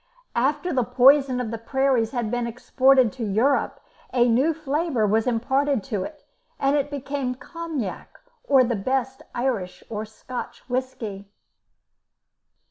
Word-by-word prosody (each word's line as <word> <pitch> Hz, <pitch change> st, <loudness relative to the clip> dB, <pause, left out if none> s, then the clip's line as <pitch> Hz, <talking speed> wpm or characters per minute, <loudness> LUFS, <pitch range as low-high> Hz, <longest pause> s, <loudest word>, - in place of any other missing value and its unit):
After 290 Hz, +8 st, +1 dB
the 255 Hz, -2 st, +2 dB
poison 265 Hz, +1 st, +5 dB
of 235 Hz, -3 st, -3 dB
the 230 Hz, -, -4 dB
prairies 260 Hz, -1 st, +1 dB
had 235 Hz, -4 st, -2 dB
been 245 Hz, -1 st, -1 dB
exported 255 Hz, +1 st, +3 dB
to 255 Hz, -3 st, -5 dB
Europe, 225 Hz, +7 st, +1 dB, 0.3 s
a 245 Hz, -1 st, +3 dB
new 255 Hz, +7 st, +3 dB
flavour 300 Hz, -5 st, 0 dB
was 220 Hz, +3 st, +2 dB
imparted 265 Hz, +1 st, +1 dB
to 200 Hz, -, 0 dB
it, 305 Hz, -1 st, -9 dB, 0.3 s
and 275 Hz, +1 st, +2 dB
it 290 Hz, 0 st, 0 dB
became 275 Hz, -2 st, -3 dB
Cognac, 310 Hz, -, -6 dB, 0.2 s
or 270 Hz, -2 st, +5 dB
the 240 Hz, -1 st, 0 dB
best 260 Hz, +6 st, -1 dB
Irish 240 Hz, -8 st, -2 dB
or 215 Hz, -1 st, -3 dB
Scotch 220 Hz, +3 st, -8 dB
whisky. 230 Hz, -6 st, -4 dB
255 Hz, 135 wpm, -24 LUFS, 230-275 Hz, 0.3 s, poison